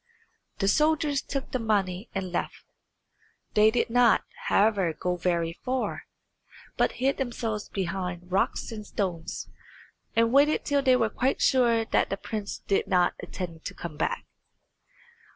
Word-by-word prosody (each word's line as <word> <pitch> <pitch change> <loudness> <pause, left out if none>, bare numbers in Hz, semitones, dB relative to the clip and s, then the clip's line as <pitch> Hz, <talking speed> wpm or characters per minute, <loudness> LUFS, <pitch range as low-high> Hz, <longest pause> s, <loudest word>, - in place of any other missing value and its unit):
The 195 - 0
soldiers 300 +3 +2
took 275 -1 -5
the 255 - -1
money 200 -2 0
and 190 -2 -3
left; 175 - -3 0.9
they 215 +1 +6
did 235 0 0
not, 245 -1 +5 0.2
however, 200 -5 +3
go 180 +3 -2
very 170 -2 0
far, 255 0 -2 0.7
but - - +2
hid 270 +2 0
themselves 230 -5 -3
behind 180 -1 -4
rocks 195 +5 0
and 215 -2 -6
stones, 180 -5 -3 0.7
and 230 +1 +3
waited 290 +2 +4
till 285 -1 +2
they 260 -2 +5
were 225 -4 +1
quite 260 +5 0
sure 235 -3 +3
that - - +1
the 195 - -2
prince 210 -1 -5
did 195 - +1
not 180 -2 +3
intend 170 -4 -6
to - - -5
come 170 -3 -7
back. 155 - -2
215 Hz, 145 wpm, -27 LUFS, 180-250 Hz, 0.9 s, they